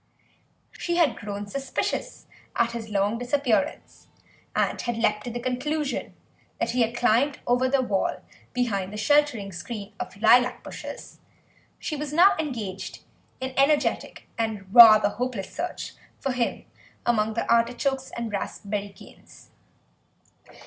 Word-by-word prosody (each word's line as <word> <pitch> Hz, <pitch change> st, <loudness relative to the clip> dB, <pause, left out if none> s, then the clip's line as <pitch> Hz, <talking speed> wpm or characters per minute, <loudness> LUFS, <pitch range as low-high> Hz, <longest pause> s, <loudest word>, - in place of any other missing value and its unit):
She 345 Hz, -, -3 dB
had 340 Hz, -4 st, +3 dB
grown 205 Hz, 0 st, -6 dB
suspicious 270 Hz, +6 st, -3 dB, 0.3 s
at 235 Hz, 0 st, +2 dB
his 230 Hz, -2 st, -6 dB
long 205 Hz, +2 st, 0 dB
disappearance, 245 Hz, -5 st, -1 dB, 0.5 s
and -, -, 0 dB
had 240 Hz, -2 st, -2 dB
leapt 210 Hz, -1 st, +1 dB
to -, -, -3 dB
the 240 Hz, +1 st, -4 dB
conclusion 275 Hz, +4 st, -2 dB, 0.4 s
that -, -, 0 dB
he 250 Hz, +1 st, +1 dB
had 230 Hz, +1 st, +1 dB
climbed 245 Hz, +4 st, +2 dB
over 250 Hz, +1 st, +2 dB
the 270 Hz, -1 st, +2 dB
wall 205 Hz, -6 st, -1 dB, 0.3 s
behind 200 Hz, -7 st, -1 dB
the 210 Hz, -, -6 dB
sheltering 240 Hz, -4 st, +2 dB
screen 205 Hz, +3 st, -7 dB
of -, -, -4 dB
the 200 Hz, -, -17 dB
lilac 245 Hz, +3 st, +4 dB
bushes; -, -, -9 dB, 0.6 s
she 310 Hz, -, -4 dB
was 295 Hz, 0 st, -4 dB
now 350 Hz, +6 st, +6 dB
engaged 210 Hz, -11 st, -5 dB, 0.4 s
in 260 Hz, 0 st, -4 dB
energetic 290 Hz, +2 st, +1 dB
and 210 Hz, -4 st, -3 dB
rather 215 Hz, -3 st, +9 dB
hopeless 235 Hz, -4 st, -4 dB
search -, -, -4 dB, 0.3 s
for 270 Hz, -, -1 dB
him 245 Hz, -2 st, -2 dB, 0.4 s
among 220 Hz, -2 st, +1 dB
the -, -, -1 dB
artichokes 245 Hz, +3 st, +1 dB
and 235 Hz, -2 st, -3 dB
raspberry 205 Hz, 0 st, -4 dB
canes. 195 Hz, -, -17 dB
235 Hz, 135 wpm, -25 LUFS, 210-265 Hz, 0.6 s, rather